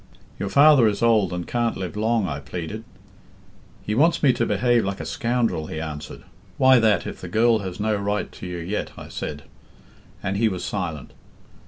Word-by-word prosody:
'Your 100 - -2
father 140 -3 +6
is 105 +1 -1
old, 110 -6 +3
and 90 -1 -4
can't 120 -1 -1
live 95 +1 -5
long,' 110 -1 +1
I 70 -4 -4
pleaded. 85 +9 -6 1.0
'He 105 - -1
wants 155 +9 +3
me 135 -3 +5
to 120 -1 0
behave 120 +3 +2
like 95 0 -3
a - - -5
scoundrel,' 115 -9 -1
he 80 - -5
answered. 75 -2 -7 0.3
'Why 130 -2 +6
that, 110 -2 +2
if - - -7
the 90 - -6
girl 110 +4 +3
has 95 -3 -6
no 110 0 +1
right 100 +1 -2
to - - -9
you 90 -1 -5
yet?' 90 +5 -4
I - - -9
said, - - -6 0.8
and 100 0 -1
he 110 +1 +3
was 95 -3 -4
silent. 80 -9 -4
105 Hz, 190 wpm, -23 LUFS, 90-115 Hz, 1.0 s, father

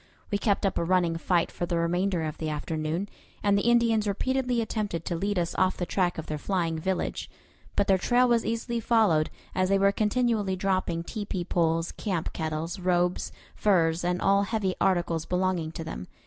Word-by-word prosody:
We 205 - +1
kept 205 -1 +1
up 195 - 0
a - - 0
running 175 -1 +2
fight 170 0 +1
for 175 - -3
the 170 - 0
remainder 175 +1 0
of 155 -1 -4
the 160 - -2
afternoon, 155 +4 -2 0.4
and 205 -1 +3
the 200 +4 +2
Indians 230 -3 +3
repeatedly 250 +4 0
attempted 210 -7 -2
to 175 - -2
lead 200 +4 -1
us 170 -1 0
off 185 0 +2
the 175 - -2
track 180 -1 0
of 160 - -4
their 150 -1 -4
flying 165 -2 -1
village; 190 +3 -2 0.5
but 200 - +2
their 190 -1 +3
trail 245 +6 +3
was 235 -2 +3
easily 230 +1 -2
followed, 215 -9 +3 0.2
as 185 0 +1
they 195 - +4
were 200 0 +4
continually 215 -2 +1
dropping 185 -3 -1
tepee 195 -2 -4
poles, 165 -1 +1
camp 185 -7 -3
kettles, 160 +3 -3
robes, 180 0 +1 0.2
furs, 170 -5 +2
and 180 +1 0
all 200 +1 +4
heavy 200 -2 -1
articles 170 -4 +1
belonging 180 -3 0
to 165 - -5
them. 125 - -6
185 Hz, 190 wpm, -27 LUFS, 170-205 Hz, 0.5 s, they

